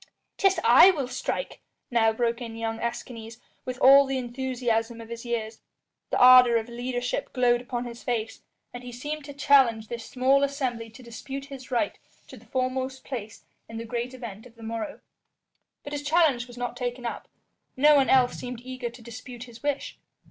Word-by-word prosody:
"'Tis 390 -1 +3
I 375 - +8
will 290 -9 0
strike," 380 - -4 0.3
now 225 -2 +4
broke 235 +2 -1
in 230 -2 -6
young 225 0 -3
Escanes, 230 -1 -5 0.3
with 255 -1 -4
all 275 +2 +7
the 270 0 -1
enthusiasm 240 -2 -2
of 230 0 -10
his 235 +1 -7
years. 225 -2 -3 0.5
The - - 0
ardour 250 -1 +8
of 225 0 -3
leadership 245 +1 -3
glowed 245 -2 +3
upon 245 -1 -4
his 235 0 -8
face, 225 -3 -3 0.3
and 245 - -7
he 245 - -8
seemed 295 +5 -5
to 285 - -8
challenge 260 -6 +4
this 235 -1 -5
small 265 +3 +2
assembly 260 -5 -2
to 220 +3 -14
dispute 270 +4 -7
his 275 -2 -10
right 255 +4 -1 0.3
to - - -10
the - - -17
foremost 260 0 -2
place 225 -4 -7 0.3
in 225 - -7
the 230 - -5
great 240 +2 -4
event 230 -3 -9
of 235 - -21
the 230 - -14
morrow. 230 +6 -5 0.8
But 285 - -7
his 290 - -3
challenge 290 -5 +2
was 245 0 -13
not 245 0 -3
taken 245 0 -4
up; 235 - -5 0.5
no 295 +3 +6
one 275 -2 +3
else 255 -2 +4
seemed 245 -1 -7
eager 255 -1 -5
to 235 0 -14
dispute 240 +1 -9
his 235 -2 -13
wish. 285 -1 -3
245 Hz, 185 wpm, -26 LUFS, 235-265 Hz, 0.8 s, I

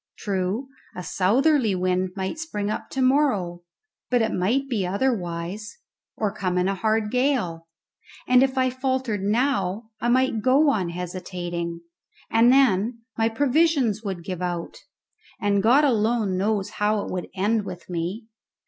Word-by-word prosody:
True, 195 +5 -2 0.3
a 180 - -5
southerly 225 - +2
wind 185 0 0
might 190 +10 -3
spring 210 -10 -3
up - - -5
to 265 - -1
morrow, 255 -11 +2 0.5
but 245 -2 +3
it 220 - -1
might 240 +10 +1
be 230 -7 -1
otherwise, 195 - -2 0.4
or 210 -2 -1
come 185 -3 -2
in 180 +1 +2
a 195 - +1
hard 215 +2 0
gale; 245 -11 0 0.6
and 250 0 +6
if 265 0 +1
I 255 0 +2
faltered 260 -5 -1
now 220 -1 0
I 240 - 0
might 255 -3 +2
go 280 +5 +4
on 190 -9 -1
hesitating, 175 -1 -5 0.5
and 230 +2 +5
then 235 -3 +3
my 225 0 +2
provisions 275 -3 +2
would 190 -5 -4
give 180 0 -5
out, 175 -2 -3 0.6
and 200 -1 +2
God 250 +8 +5
alone 225 -6 +1
knows 200 +1 0
how 210 0 +1
it - - -6
would 180 -1 -4
end 210 +3 +1
with 185 -2 -8
me. 180 +6 -4
210 Hz, 150 wpm, -24 LUFS, 185-255 Hz, 0.6 s, and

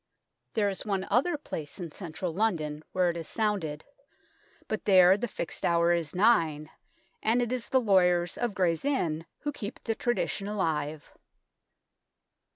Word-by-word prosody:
There 210 -2 +2
is 195 -1 -3
one 195 -2 -1
other 275 - +2
place 155 - -6
in 170 -3 -5
central 170 0 -5
London 160 -7 -1
where 180 -1 +2
it 170 - -7
is 165 - -6
sounded, 195 -9 -2 0.8
but 220 - -3
there 185 -1 +7
the 240 +4 -2
fixed 195 - -5
hour 170 0 +3
is 170 -2 -2
nine, 165 -8 +3 0.5
and 225 +3 +2
it 240 -1 0
is 255 -2 -3
the 260 - +4
lawyers 180 -6 +3
of 240 -4 -2
Gray's 170 -4 +1
Inn 170 - -1
who 295 - -2
keep 215 -5 -7
the 225 - 0
tradition 225 -3 -1
alive. 155 -7 -2
185 Hz, 155 wpm, -29 LUFS, 165-220 Hz, 0.8 s, there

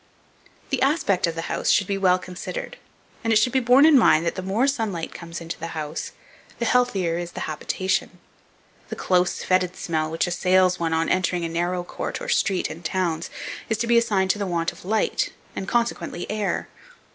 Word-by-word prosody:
The 270 -2 0
aspect 270 - +2
of 165 - -3
the 165 - -3
house - - -2
should 200 - +4
be 200 - -1
well 185 -2 +3
considered, 185 - -6 0.5
and 225 - +1
it - - +4
should 230 +3 +3
be 265 - +4
borne 255 +4 +6
in 310 -4 +7
mind 165 -7 +4
that 170 - 0
the - - -5
more 195 +7 +1
sunlight 220 - -1
that - - -9
comes 170 0 -7
into 165 0 -6
the 165 0 -6
house, 155 +1 -4 0.5
the 235 - -1
healthier 195 -10 +2
is 175 0 -6
the - - -6
habitation. 185 +5 -2 0.7
The - - -4
close, 180 -1 +1
fetid 185 -1 +1
smell 155 -2 -2
which 165 +1 0
assails 185 +1 +2
one 165 -1 0
on 160 0 +1
entering 180 -2 +1
a - - -3
narrow 175 +2 -1
court, - - -5
or - - -6
street, 190 -3 +1
in 165 - -9
towns, 170 -1 -1 0.4
is 225 - +1
to 230 - -1
be 235 0 +5
assigned 195 -5 +2
to 205 - -4
the 200 - -1
want 170 -2 0
of - - -15
light, 215 +3 0 0.2
and, 190 - -4
consequently, 235 -6 -1
air. 210 -2 -1
185 Hz, 205 wpm, -24 LUFS, 170-220 Hz, 0.7 s, in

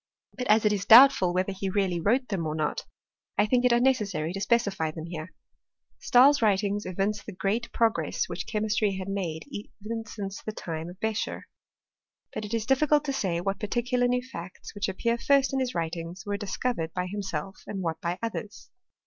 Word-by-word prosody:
But 250 - -4
as 215 +1 +4
it 210 - +4
is 200 -1 -1
doubtful 240 -6 +8
whether 185 +2 0
he 190 0 -3
really 190 -3 0
wrote 245 +9 +1
them 180 -6 -2
or 155 - -2
not, 155 -1 -2 0.5
I - - +4
think 245 +3 +2
it 250 - +4
unnecessary 210 -10 +1
to 195 - -4
specify 200 -7 +1
them 160 0 -7
here. 165 0 -7 0.7
Stahl's 275 +3 +5
writings 205 -1 +1
evince 200 +3 -1
the - - -8
great 200 +6 -2
progress 230 -1 +1
which - - -5
chemistry 210 -2 0
had 190 0 -5
made 180 -5 -3 0.4
even 225 +2 -5
since 200 -2 -6
the 215 - -5
time 165 -4 -5
of 180 +2 -12
Beccher. 220 -1 -2 0.9
But 215 - -4
it 210 - -7
is 225 -1 -2
difficult 295 +3 +3
to 275 - -1
say 180 -9 -1
what 195 +2 -2
particular 245 +3 0
new 250 0 0
facts, 180 -8 -9
which 205 -1 -2
appear 235 +5 -1
first 275 0 +3
in 270 - +1
his 255 -1 -2
writingrs 170 +1 -4
were 205 0 -2
discovered 200 -4 -3
by 180 -1 -1
himself, 190 -2 -5
and 195 -2 -4
what 165 -2 -3
by 170 +1 -2
others. 220 -2 -5
205 Hz, 190 wpm, -27 LUFS, 180-235 Hz, 0.9 s, doubtful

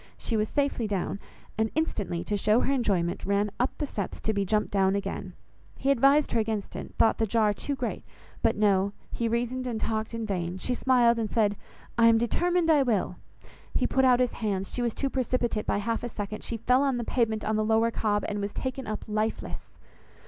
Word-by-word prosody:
She 230 - -2
was 215 0 +1
safely 280 -5 0
down, 195 -1 -2 0.4
and 220 0 +2
instantly, 205 - -1
to 210 - -2
show 210 +3 +3
her 275 - +1
enjoyment, 195 -9 0
ran 200 +1 +1
up 250 - 0
the 295 - -1
steps 205 -8 -4
to 220 - 0
be 200 -1 0
jumped 210 +2 0
down 195 -1 +2
again. 200 -1 -4 0.4
He 275 - +1
advised 275 +3 +4
her 235 - +2
against 215 -2 -2
it, - - -7
thought 225 - +3
the 225 - +2
jar 215 0 +2
too 280 +7 -3
great; 250 -2 -3 0.4
but - - +2
no, 200 -1 +2 0.2
he 235 - -1
reasoned 245 +2 -1
and 230 -3 -2
talked 220 +1 -2
in 230 -1 -3
vain, 180 -3 -2
she 250 +7 -2
smiled 240 -2 +3
and 220 -2 -1
said, 210 -3 +2 0.4
"I 230 - +7
am 230 0 +6
determined 340 +9 +2
I 300 -3 +5
will:" 235 -7 0 0.6
he - - +2
put 265 - +2
out 250 -1 +5
his 250 -1 +2
hands; 195 -3 -3
she 245 - -2
was 235 -2 -1
too 275 - -1
precipitate 245 -4 -1
by - - +1
half 225 +3 -2
a 240 - -3
second, 210 -1 -5
she 230 - -3
fell 250 +4 +3
on 275 -3 +1
the 240 - -2
pavement 220 -2 0
on 215 - 0
the 215 - +1
Lower 225 +1 +3
Cobb, 205 -2 0
and 205 -1 -3
was 200 0 -3
taken 260 0 -4
up 215 0 -4
lifeless! 215 +1 -2
225 Hz, 215 wpm, -27 LUFS, 205-250 Hz, 0.6 s, I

